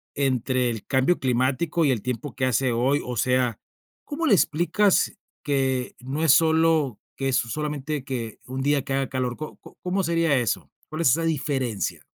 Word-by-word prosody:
entre 130 -2 +1
el 110 -3 -7
cambio 135 +6 +2
climático 135 +6 +1
y 140 - +3
el 120 -5 -1
tiempo 125 +3 -4
que 130 - 0
hace 130 0 +1
hoy? 130 +5 +1
O 125 - -4
sea, 125 0 +1 0.5
¿cómo 315 +3 -3
le 230 - +5
explicas 175 +5 +2 0.3
que 135 -3 0
no 135 +5 -3
es 160 - +6
solo 160 -5 +3 0.2
que 135 0 -1
es 130 - +2
solamente 150 +3 -3
que 120 -5 -5
un 130 +1 -4
día 140 0 +1
que 135 - -4
haga 135 0 0
calor? 125 -2 -2
¿Co 155 - -7
co - - -16
cómo 185 +2 -1
sería 165 -3 +2
eso? 95 - -1 0.2
¿Cuál 155 +2 -4
es 165 - +4
esa 165 +6 +1
diferencia? 135 -8 -2
135 Hz, 180 wpm, -24 LUFS, 125-155 Hz, 0.5 s, es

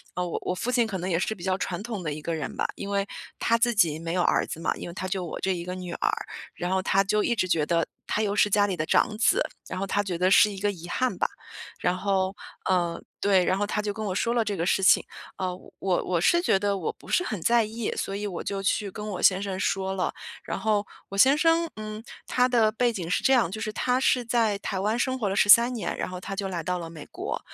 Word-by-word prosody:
我 180 -1 -2
我 - - -2
父 235 +7 -2
亲 245 -2 +3
可 210 -4 -3
能 180 +2 -3
也 170 - +2
是 190 +5 -1
比 175 - -12
较 190 0 0
传 185 -1 -3
统 215 -5 -5
的 155 - -2
一 155 - -7
个 165 +2 -2
人 155 - -5
吧， - - +1
因 200 - -6
为 200 0 0 0.3
他 230 - +3
自 240 +1 +2
己 170 -8 +3
没 165 0 -4
有 180 - +1
儿 - - +2
子 - - -6
嘛， 165 - 0
因 - - -7
为 170 - -7
他 185 - -4
就 185 0 -2
我 165 - -6
这 190 - 0
一 170 - -5
个 180 - -4
女 180 -1 -6
儿， 415 - 0 0.4
然 175 +1 -3
后 190 0 +2
他 195 +1 +3
就 210 +2 +1
一 235 - +1
直 185 - 0
觉 160 -4 +2
得 165 +1 +1 0.2
他 210 - -1
又 205 -1 0
是 210 - +4
家 205 0 +3
里 190 - -1
的 155 -2 -2
长 210 - +2
子， 215 -1 +3 0.3
然 - - -4
后 195 - -2
他 205 +2 +1
觉 185 -4 -3
得 180 +2 +3
是 210 +2 +6
一 195 - -7
个 205 +1 +1
遗 175 -3 -10
憾 255 +6 0
吧。 - - +1 0.5
然 180 - +1
后， 190 0 0 0.3
嗯， 175 -2 0 0.2
对， 195 -2 +4
然 185 - +2
后 205 +1 0
他 210 - -1
就 210 -1 -2
跟 220 - -5
我 190 -3 -2
说 230 +4 +1
了 235 -1 +2
这 205 -2 -3
个 165 - -1
事 195 - +2
情， 185 - +6 0.3
呃， 185 -1 -2 0.3
我 185 -2 0
我 175 -2 0
是 345 - +4
觉 275 - +3
得 200 0 0
我 180 - -2
不 - - -18
是 360 - +2
很 215 - -3
在 235 +5 +4
意， 220 +1 -3
所 195 - -3
以 205 +1 -3
我 185 -4 -4
就 200 -1 -3
去 200 +1 0
跟 210 +2 -6
我 200 -4 -4
先 190 0 +4
生 190 -2 -3
说 190 0 0
了。 185 -1 -1 0.3
然 - - -4
后 210 -2 +1 0.2
我 195 - -6
先 265 +8 +6
生， 330 +1 +3
嗯， 215 0 -7 0.2
他 250 0 +3
的 225 -3 +4
背 240 +2 +1
景 180 -7 -5
是 180 - 0
这 270 - +4
样， 235 -9 +3
就 215 - -5
是 220 -1 -2
他 250 +3 +1
是 255 -1 +2
在 225 -3 +1
台 195 -2 -3
湾 210 +4 0
生 260 +1 0
活 210 -4 0
了 195 - -1
13 235 +5 +7
年， 230 - -3
然 - - -3
后 180 0 -6
他 195 +2 -6
就 195 0 -2
来 175 -3 -4
到 180 +2 -1
了 165 -1 -6
美 160 -3 -10
国， - - -4
195 Hz, 295 characters per minute, -26 LUFS, 180-220 Hz, 0.5 s, 13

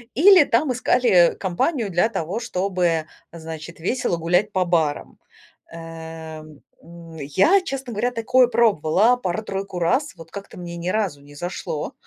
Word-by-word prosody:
Или 360 +2 +7
там 260 +4 +1
искали 235 -8 +3
компанию 205 - -1
для 175 +6 +2
того, 190 0 -3
чтобы, 180 -7 -1 0.2
значит, 165 0 -9
весело 180 0 -1
гулять 180 +5 +1
по 185 -2 0
барам. 160 -4 -1 0.5
Эм, 160 -2 -9 0.2
м, 170 -1 -13
я, 190 - +3
честно 270 -8 -5
говоря, 240 +4 -1
такое 250 +2 +3
пробовала 220 -1 +3
пару-тройку 195 -2 -4
раз, 255 - 0
вот 165 -1 -13
как-то 200 -1 -9
мне 170 -1 -7
ни 170 +1 -3
разу 185 -8 -1
не 145 +1 -16
зашло. 175 -2 -5
180 Hz, 140 wpm, -22 LUFS, 165-230 Hz, 0.5 s, Или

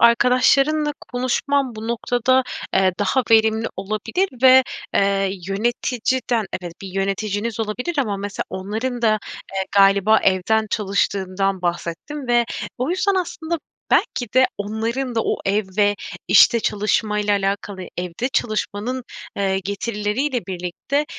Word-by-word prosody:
arkadaşlarınla 275 +5 +4 0.2
konuşman 255 +1 0
bu 220 +1 -6
noktada, 245 +2 +2 0.3
eee, 190 -1 +4
daha 205 +6 +2
verimli 220 0 +4
olabilir 215 - -1
ve, 260 0 +8 0.3
eee, 195 -1 +2 0.2
yöneticiden, 235 +2 0 0.2
evet 175 -1 -6
bir 195 - -6
yöneticiniz 200 +3 -2
olabilir 245 +10 -3
ama 215 -7 0
mesela 200 0 -4
onların 225 +6 -3
da, 220 -2 +4 0.4
eee, 190 - 0
galiba 200 +2 +5
evden 215 +4 +2
çalıştığından 195 -2 0
bahsettin 175 - -3
ve 240 -1 +3 0.3
o 255 +5 -1
yüzden, 390 +2 +1
aslında, 340 -2 -2 0.3
belki 245 -4 +1
de 260 0 +6
onların 230 +5 -2
da 225 - +2
o - - 0
ev 205 +2 +1
ve 205 0 +4 0.3
işte 235 -2 +6
çalışmayla 210 0 0
alakalı 195 -1 -1
evde 180 +7 -3
çalışmanın, 220 +3 -2 0.3
eee, 190 -1 +1
getirileriyle 210 +4 -2
birlikte 185 +11 -2
215 Hz, 120 wpm, -21 LUFS, 195-250 Hz, 0.4 s, ve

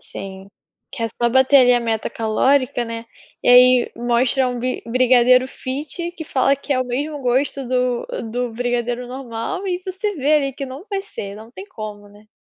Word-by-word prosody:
Sim, 195 0 -9 0.4
que 235 - -5
é 230 - 0
só 235 +2 -1
bater 265 +3 +5
ali 250 -1 +6
a 240 - +2
meta 225 -2 -2
calórica, 245 +3 +1
né. 230 0 -6 0.4
E - - 0
aí, 250 0 +6
mostra 245 +2 +2
um 245 -1 -4
bi 255 +1 -3
brigadeiro 255 +1 +4
fit 295 +7 -4
que 330 -2 -8
fala 275 -1 +2
que 280 +1 -3
é 255 - +1
o - - 0
mesmo 285 +4 -3
gosto 265 +1 0
do-do 245 -1 -2
brigadeiro 245 +1 -2
normal. 260 - -5
E 360 -1 -2
você 385 +2 -3
vê 290 +2 +2
ali 275 -3 +1
que 275 +1 -6
não 265 +6 -9
vai 390 -1 -2
ser, 200 - -7
não 220 +2 -12
tem 385 +10 -10
como, 210 - -8
né. 210 +1 -19
250 Hz, 190 wpm, -20 LUFS, 235-275 Hz, 0.4 s, ali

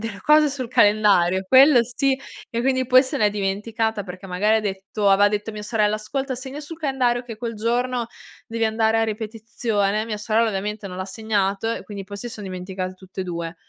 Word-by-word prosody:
delle 215 -2 -6
cose 300 0 +5
sul 265 -2 -4
calendario. 205 -6 +4
Quello 265 +2 +7
sì 265 +3 0 0.3
e 235 -2 -2
quindi 260 +1 +1
poi 255 +1 +6
se 260 - -3
l'è 210 -1 +3
dimenticata 210 +2 -2
perché 185 +1 -9
magari 205 +4 +2
ha - - +1
detto 200 0 -2
aveva 200 +1 +5
detto 210 +1 -3
a - - -11
mia 210 0 -7
sorella. 210 -1 +1
"Ascolta 260 +5 -3
segna 265 +3 -7
sul 305 +2 -8
calendario 255 -5 0
che 230 -3 -8
quel 230 +1 -5
giorno 240 +2 -1 0.4
devi 230 0 -1
andare 220 0 +2
a 225 - +3
ripetizione." 215 -1 -2
Mia 220 -2 -4
sorella 225 +2 +1
ovviamente 210 +1 -4
non 180 - -8
l'ha 185 - -3
segnato, 205 +1 -1
e - - -5
quindi 200 -2 -7
poi 200 +1 -8
si 240 +4 -6
son 220 -3 -8
dimenticate 185 0 -5
tutte 190 0 -9
e 185 - -2
due. 170 -1 -5
215 Hz, 205 wpm, -22 LUFS, 200-240 Hz, 0.4 s, Quello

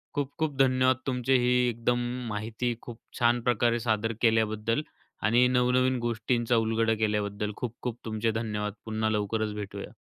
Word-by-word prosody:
खूप-खूप 145 +2 -2
धन्यवाद! 130 -1 +3
तुमचे 125 0 +1
ही 125 0 +2 0.2
एकदम 120 +1 0 0.3
माहिती 110 +3 -2
खूप 120 -1 -9 0.2
छान 120 0 +3
प्रकारे 120 0 +2
सादर 110 +1 +1
केल्याबद्दल 110 +2 +2 0.5
आणि 120 +2 +5
नवनवीन 130 +1 +3
गोष्टींचा 120 +1 0
उलगडा 115 0 +2
केल्याबद्दल 105 0 -1
खूप-खूप 120 0 -5
तुमचे 110 0 0
धन्यवाद. 105 -2 -3
पुन्हा 110 0 -1
लवकरच 105 +1 -1
भेटूया. 100 0 -7
115 Hz, 130 wpm, -28 LUFS, 110-125 Hz, 0.5 s, आणि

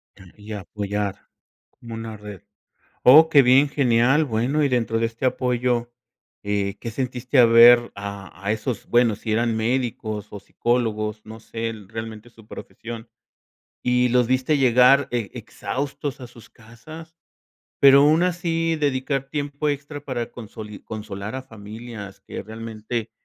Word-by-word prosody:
Quería 105 +3 -10
apoyar. 100 0 -3 0.5
Como 120 -3 -12
una 115 -1 -6
red. 105 -2 -10 0.6
Oh, 155 +6 +8
qué 145 -3 +7
bien, 130 +3 +5
genial. 135 +2 +3
Bueno, 130 +5 0
y 140 - +2
dentro 115 -3 0
de 115 - +1
este 115 +3 -4
apoyo, 125 -1 0 0.5
eh, 100 -1 -2
¿qué 115 - -5
sentiste 125 +2 -3
al 115 -2 +7
ver 120 +1 +7
a 100 -1 -7
a 105 - +1
esos? 110 0 -4
Bueno, 120 -3 +3
si 110 +1 -5
eran 115 0 +1
médicos 110 -3 -2
o 100 - -7
psicólogos, 110 -3 -2
no 110 +1 -10
sé, 115 +1 -5
e 115 - -5
realmente 110 +1 -8
su 110 -2 -19
profesión, 115 0 -9 0.7
¿y 125 0 +2
los 125 -1 +3
viste 130 +4 +1
llegar 125 +2 +5
e 120 -4 -2
exhaustos 140 +1 -5
a 125 - -8
sus 115 -1 -16
casas, 155 +9 -13 0.7
pero 140 0 +8
aún 155 +3 +4
así, 165 -2 0
dedicar 135 -1 -1
tiempo 145 0 -2
extra 145 +1 -4
para 120 -4 -4
consoli 110 -2 -10
consolar 105 0 -7
a 130 - -4
familias 110 -3 -10
que - - -8
realmente 110 +1 -6
120 Hz, 145 wpm, -23 LUFS, 110-130 Hz, 0.7 s, Oh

